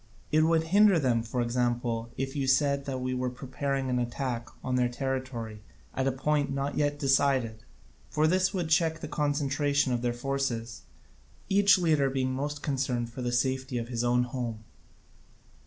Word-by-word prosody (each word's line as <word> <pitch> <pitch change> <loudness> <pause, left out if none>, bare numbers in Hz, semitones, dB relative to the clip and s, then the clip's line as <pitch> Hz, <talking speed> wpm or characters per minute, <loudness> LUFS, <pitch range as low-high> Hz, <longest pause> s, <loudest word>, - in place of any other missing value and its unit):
It 155 +1 +4
would 160 0 +3
hinder 200 +3 +5
them, 125 -6 +2
for 115 +2 -2
example, 120 -1 -1
if 135 +2 -3
you 140 -2 -1
said 140 +1 +2
that 130 -2 -3
we 130 0 -1
were 125 0 -1
preparing 135 +2 -3
an 125 -1 0
attack 120 -1 -3
on 130 - -2
their 125 -1 +2
territory 125 -4 -4 0.3
at 130 0 0
a - - +3
point 145 +2 0
not 140 +1 -2
yet 145 -1 +1
decided; 135 -5 +2 0.5
for 155 - +1
this 185 +3 +3
would 175 -4 -2
check 160 0 +2
the - - -4
concentration 145 -2 +1
of 120 - -1
their 120 -1 0
forces, 120 -2 -3 0.7
each 200 0 +5
leader 155 -6 +2
being 130 -1 -1
most 145 +2 -3
concerned 130 -4 -1
for 130 - -6
the 120 -1 -1
safety 130 +1 0
of 115 0 -4
his 120 -1 -2
own 120 0 +3
home. 120 -3 -4
130 Hz, 170 wpm, -28 LUFS, 120-145 Hz, 0.7 s, hinder